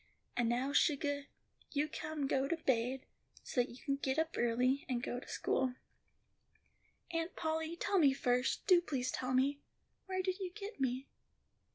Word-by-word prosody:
"And 240 Hz, -2 st, +2 dB
now, 255 Hz, +4 st, 0 dB
sugah, 285 Hz, -2 st, +2 dB, 0.5 s
you 295 Hz, +1 st, +2 dB
come 305 Hz, -1 st, -3 dB
go 270 Hz, 0 st, +1 dB
to 335 Hz, -, 0 dB
baid, 260 Hz, -3 st, 0 dB, 0.4 s
so 250 Hz, -, +1 dB
you 240 Hz, 0 st, -5 dB
can 275 Hz, +1 st, -1 dB
get 265 Hz, 0 st, -1 dB
up 320 Hz, +1 st, +1 dB
early, 250 Hz, +4 st, +2 dB
and 245 Hz, -1 st, 0 dB
go 245 Hz, -, -2 dB
to -, -, -13 dB
school." 255 Hz, -1 st, 0 dB, 1.4 s
"Aunt 330 Hz, +1 st, -2 dB
Polly, 320 Hz, 0 st, -1 dB
tell 390 Hz, +3 st, +1 dB
me 285 Hz, -5 st, +6 dB
first, 250 Hz, -1 st, +1 dB
do 365 Hz, -3 st, +7 dB
please 260 Hz, -6 st, -1 dB
tell 255 Hz, 0 st, -1 dB
me, 280 Hz, +2 st, +3 dB, 0.5 s
where 375 Hz, 0 st, -1 dB
did 370 Hz, +1 st, -1 dB
you 375 Hz, -2 st, -2 dB
get 410 Hz, -, -7 dB
me?" 260 Hz, +1 st, 0 dB
275 Hz, 165 wpm, -35 LUFS, 255-320 Hz, 1.4 s, do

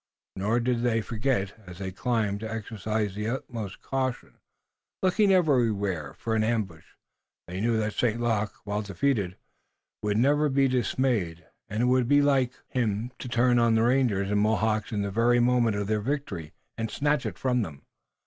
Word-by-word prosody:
Nor 105 Hz, +5 st, +1 dB
did 120 Hz, 0 st, 0 dB
they 120 Hz, -2 st, +2 dB
forget, 105 Hz, -1 st, -1 dB
as 90 Hz, 0 st, -9 dB
they 95 Hz, 0 st, -4 dB
climbed, 105 Hz, 0 st, -1 dB
to 110 Hz, 0 st, -5 dB
exercise 110 Hz, -1 st, -2 dB
the 105 Hz, +2 st, -3 dB
utmost 115 Hz, -5 st, -5 dB
caution, 130 Hz, -2 st, -3 dB, 0.6 s
looking 195 Hz, +2 st, +4 dB
everywhere 110 Hz, -, +1 dB
for 115 Hz, -, -3 dB
an 110 Hz, -1 st, +2 dB
ambush. 105 Hz, -8 st, -2 dB, 0.5 s
They 90 Hz, +2 st, -4 dB
knew 115 Hz, 0 st, +2 dB
that 110 Hz, -1 st, -1 dB
St. 115 Hz, -1 st, 0 dB
Luc, 110 Hz, -4 st, 0 dB
while 105 Hz, 0 st, -2 dB
defeated, 100 Hz, -1 st, -1 dB, 0.6 s
would 105 Hz, 0 st, 0 dB
never 145 Hz, +5 st, +3 dB
be 135 Hz, 0 st, +3 dB
dismayed, 120 Hz, -9 st, 0 dB, 0.2 s
and 110 Hz, +3 st, -1 dB
it -, -, +4 dB
would 125 Hz, -1 st, +3 dB
be 145 Hz, +2 st, +5 dB
like 135 Hz, -3 st, +2 dB
him 115 Hz, -1 st, -1 dB
to -, -, -6 dB
turn 120 Hz, +1 st, +3 dB
on 115 Hz, -1 st, +4 dB
the 110 Hz, -, +3 dB
rangers 115 Hz, -6 st, +2 dB
and 105 Hz, 0 st, +2 dB
Mohawks 110 Hz, -1 st, +1 dB
in 105 Hz, -2 st, -1 dB
the 100 Hz, -, -3 dB
very 120 Hz, +4 st, +3 dB
moment 120 Hz, -3 st, +3 dB
of 100 Hz, 0 st, -1 dB
their 105 Hz, +1 st, 0 dB
victory 105 Hz, -, -3 dB, 0.3 s
and 115 Hz, 0 st, -1 dB
snatch 145 Hz, +4 st, 0 dB
it -, -, -6 dB
from 125 Hz, -2 st, +1 dB
them. 80 Hz, -9 st, -6 dB
115 Hz, 175 wpm, -27 LUFS, 100-125 Hz, 0.6 s, be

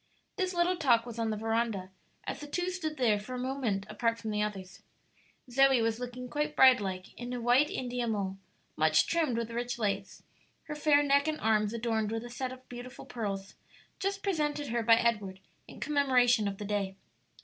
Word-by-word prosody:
This 370 Hz, -2 st, -1 dB
little 350 Hz, +1 st, +2 dB
talk 240 Hz, -7 st, +3 dB
was 235 Hz, -1 st, -7 dB
on 225 Hz, -1 st, 0 dB
the 215 Hz, -, -2 dB
veranda, 225 Hz, -3 st, -1 dB, 0.3 s
as -, -, -4 dB
the 295 Hz, -, -8 dB
two 355 Hz, +5 st, -1 dB
stood 315 Hz, -4 st, -4 dB
there 220 Hz, -5 st, +3 dB
for 255 Hz, +5 st, -7 dB
a -, -, -3 dB
moment 250 Hz, -6 st, -2 dB
apart 230 Hz, +2 st, 0 dB
from 220 Hz, -1 st, -5 dB
the 210 Hz, 0 st, 0 dB
others. 195 Hz, -3 st, -5 dB, 0.7 s
Zoe 270 Hz, +1 st, +4 dB
was 225 Hz, 0 st, 0 dB
looking 250 Hz, 0 st, -6 dB
quite 300 Hz, +3 st, -2 dB
bride 260 Hz, -3 st, +7 dB
like 185 Hz, -2 st, -5 dB
in 245 Hz, 0 st, -5 dB
a 245 Hz, -, -3 dB
white 245 Hz, +5 st, +4 dB
India 245 Hz, -1 st, -3 dB
mull, 195 Hz, -3 st, -2 dB, 0.4 s
much 155 Hz, 0 st, +4 dB
trimmed 315 Hz, -8 st, +1 dB
with 235 Hz, 0 st, -3 dB
rich 240 Hz, +1 st, -3 dB
lace, 200 Hz, -3 st, -2 dB, 0.4 s
her 300 Hz, -, -6 dB
fair 295 Hz, -1 st, +4 dB
neck 280 Hz, +1 st, +3 dB
and 310 Hz, 0 st, -1 dB
arms 215 Hz, -1 st, +2 dB
adorned 225 Hz, -2 st, -1 dB
with 225 Hz, 0 st, -3 dB
a 240 Hz, -, -9 dB
set 255 Hz, +1 st, -3 dB
of 255 Hz, 0 st, -12 dB
beautiful 245 Hz, +1 st, -9 dB
pearls, 200 Hz, -6 st, -4 dB, 0.5 s
just 395 Hz, 0 st, -2 dB
presented 300 Hz, -7 st, -1 dB
her 235 Hz, +1 st, 0 dB
by 230 Hz, 0 st, +6 dB
Edward 210 Hz, -5 st, 0 dB, 0.3 s
in -, -, -12 dB
commemoration 250 Hz, -6 st, +3 dB
of 195 Hz, -1 st, -3 dB
the 205 Hz, -, -6 dB
day. 200 Hz, -2 st, -2 dB
240 Hz, 195 wpm, -30 LUFS, 215-275 Hz, 0.7 s, bride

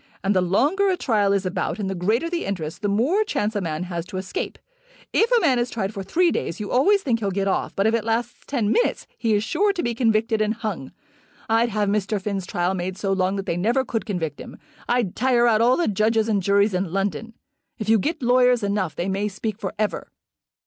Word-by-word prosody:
And 200 Hz, +1 st, +1 dB
the 185 Hz, -, +4 dB
longer 290 Hz, -, +2 dB
a 370 Hz, -, +1 dB
trial 210 Hz, -, +1 dB
is 200 Hz, -1 st, +1 dB
about 185 Hz, 0 st, -2 dB
and 205 Hz, -3 st, -3 dB
the 190 Hz, -, -2 dB
greater 215 Hz, -, 0 dB
the 345 Hz, 0 st, -2 dB
interest, 165 Hz, -6 st, -4 dB
the 205 Hz, -, 0 dB
more 255 Hz, -, +2 dB
chance 215 Hz, -, -2 dB
a 205 Hz, -, 0 dB
man 160 Hz, -1 st, -3 dB
has 175 Hz, -2 st, -4 dB
to 190 Hz, -, -6 dB
escape. 285 Hz, -, -4 dB, 0.6 s
If 460 Hz, +2 st, +3 dB
a 485 Hz, -, +5 dB
man 265 Hz, -8 st, +3 dB
is 240 Hz, +1 st, 0 dB
tried 215 Hz, -2 st, -3 dB
for 200 Hz, -, -5 dB
three 340 Hz, -, +2 dB
days 170 Hz, -, -3 dB
you 210 Hz, -, -5 dB
always 395 Hz, +10 st, +3 dB
think 235 Hz, -4 st, +1 dB
he'll 200 Hz, -3 st, -1 dB
get 195 Hz, +1 st, -1 dB
off, 195 Hz, -, -1 dB
but 195 Hz, -, +1 dB
if 220 Hz, -, +3 dB
it 230 Hz, -2 st, +1 dB
lasts 230 Hz, +2 st, -2 dB
ten 230 Hz, -7 st, 0 dB
minutes 480 Hz, -, +1 dB
he 225 Hz, -3 st, +1 dB
is 205 Hz, -, +1 dB
sure 390 Hz, -, +1 dB
to 355 Hz, -, -3 dB
be 235 Hz, -1 st, 0 dB
convicted 225 Hz, -2 st, +1 dB
and 215 Hz, +1 st, +1 dB
hung. 210 Hz, -, -5 dB, 0.6 s
I'd 225 Hz, +1 st, +2 dB
have 210 Hz, -1 st, 0 dB
Mr. 205 Hz, +1 st, 0 dB
Finn's 195 Hz, -2 st, -3 dB
trial 175 Hz, +2 st, 0 dB
made 185 Hz, 0 st, -4 dB
so 195 Hz, 0 st, -1 dB
long 190 Hz, 0 st, 0 dB
that 195 Hz, -1 st, -4 dB
they 170 Hz, -, -1 dB
never 235 Hz, +8 st, +1 dB
could 225 Hz, -3 st, -3 dB
convict 165 Hz, -8 st, -3 dB
him. -, -, -10 dB, 0.3 s
I'd 240 Hz, -7 st, +1 dB
tire 245 Hz, -1 st, +3 dB
out 225 Hz, -2 st, +4 dB
all 245 Hz, +2 st, +4 dB
the 345 Hz, -, +1 dB
judges 215 Hz, +2 st, +1 dB
and 210 Hz, -3 st, +1 dB
juries 200 Hz, +2 st, +3 dB
in 180 Hz, -2 st, -1 dB
London. 195 Hz, +3 st, -2 dB, 0.4 s
If 215 Hz, -, -5 dB
you 220 Hz, 0 st, +4 dB
get 305 Hz, -, -2 dB
lawyers 250 Hz, -1 st, +4 dB
enough 200 Hz, -4 st, -1 dB
they 175 Hz, -, -2 dB
may 195 Hz, +2 st, -1 dB
speak 210 Hz, +1 st, -4 dB
for 195 Hz, -, -3 dB
ever." 210 Hz, 0 st, -2 dB
215 Hz, 240 wpm, -23 LUFS, 195-240 Hz, 0.6 s, a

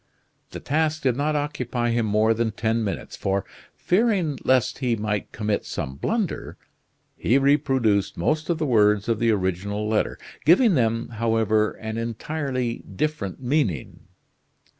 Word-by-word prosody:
The -, -, -7 dB
task 155 Hz, +2 st, 0 dB
did 130 Hz, -3 st, +2 dB
not 150 Hz, +3 st, 0 dB
occupy 125 Hz, -5 st, -1 dB
him 115 Hz, -1 st, +1 dB
more 110 Hz, +2 st, +3 dB
than 115 Hz, 0 st, 0 dB
ten 115 Hz, +1 st, 0 dB
minutes, 100 Hz, -, -4 dB
for, 100 Hz, 0 st, -1 dB, 0.3 s
fearing 185 Hz, -, +1 dB
lest 130 Hz, -2 st, +2 dB
he 125 Hz, -4 st, +1 dB
might 105 Hz, -1 st, -3 dB
commit 105 Hz, -1 st, -1 dB
some 65 Hz, -, -4 dB
blunder, 205 Hz, -, -2 dB, 0.6 s
he 120 Hz, -, +2 dB
reproduced 135 Hz, -7 st, +2 dB
most 155 Hz, -, 0 dB
of 170 Hz, -, +1 dB
the 155 Hz, -, -1 dB
words 105 Hz, -5 st, +3 dB
of 115 Hz, -2 st, 0 dB
the 115 Hz, -, +2 dB
original 100 Hz, +1 st, -1 dB
letter, 110 Hz, 0 st, 0 dB, 0.3 s
giving 190 Hz, -, +5 dB
them, 115 Hz, -4 st, +1 dB
however, 110 Hz, -2 st, +1 dB
an 110 Hz, 0 st, -5 dB
entirely 125 Hz, +1 st, -3 dB, 0.2 s
different 130 Hz, -6 st, -2 dB
meaning. 125 Hz, -, -1 dB
115 Hz, 140 wpm, -24 LUFS, 105-145 Hz, 0.6 s, giving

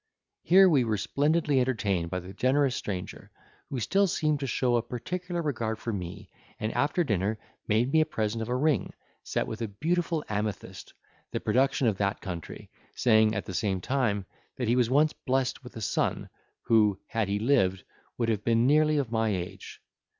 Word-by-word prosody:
Here 190 Hz, +3 st, +6 dB
we 145 Hz, -8 st, +4 dB
were 110 Hz, -2 st, 0 dB
splendidly 145 Hz, -, +1 dB
entertained 100 Hz, -9 st, 0 dB
by 90 Hz, +1 st, -3 dB
the 90 Hz, +2 st, -10 dB
generous 130 Hz, +2 st, +2 dB
stranger, 90 Hz, -3 st, -5 dB, 0.4 s
who 135 Hz, -, -3 dB
still 195 Hz, -, +2 dB
seemed 155 Hz, -4 st, 0 dB
to 135 Hz, -, -3 dB
show 125 Hz, -1 st, +1 dB
a 120 Hz, -, +3 dB
particular 175 Hz, +9 st, -4 dB
regard 115 Hz, -7 st, -2 dB
for 115 Hz, 0 st, -4 dB
me, 95 Hz, +2 st, -6 dB, 0.3 s
and 110 Hz, 0 st, -2 dB
after 155 Hz, +5 st, +1 dB
dinner 105 Hz, -, 0 dB, 0.3 s
made 115 Hz, +5 st, +2 dB
me 160 Hz, -, +5 dB
a -, -, +3 dB
present 110 Hz, -5 st, -2 dB
of 110 Hz, -, -4 dB
a 125 Hz, -, 0 dB
ring, 140 Hz, -, +1 dB, 0.3 s
set -, -, -2 dB
with 110 Hz, +1 st, -6 dB
a 115 Hz, -, -1 dB
beautiful 165 Hz, -, -1 dB
amethyst, 105 Hz, -1 st, -4 dB, 0.4 s
the -, -, -3 dB
production 135 Hz, +1 st, +1 dB
of 110 Hz, -4 st, +2 dB
that 100 Hz, 0 st, 0 dB
country, 85 Hz, -4 st, -7 dB, 0.2 s
saying, 110 Hz, -2 st, +4 dB
at 95 Hz, -, -3 dB
the 95 Hz, -, -6 dB
same 95 Hz, 0 st, 0 dB
time, 105 Hz, -3 st, 0 dB, 0.3 s
that 125 Hz, -, -2 dB
he 120 Hz, -, +3 dB
was 125 Hz, -2 st, +2 dB
once 150 Hz, +4 st, +3 dB
blessed 130 Hz, 0 st, -1 dB
with 125 Hz, -, -12 dB
a 110 Hz, -, -6 dB
son, 100 Hz, -, -1 dB, 0.3 s
who, 105 Hz, -4 st, +3 dB
had 115 Hz, -3 st, -1 dB
he 100 Hz, +1 st, 0 dB
lived, 105 Hz, -6 st, +2 dB, 0.3 s
would 115 Hz, -2 st, 0 dB
have 105 Hz, -2 st, -1 dB
been 115 Hz, 0 st, +3 dB
nearly 155 Hz, +2 st, +4 dB
of 135 Hz, -5 st, -1 dB
my 110 Hz, -1 st, +1 dB
age. 90 Hz, -3 st, -5 dB
115 Hz, 185 wpm, -28 LUFS, 105-140 Hz, 0.4 s, Here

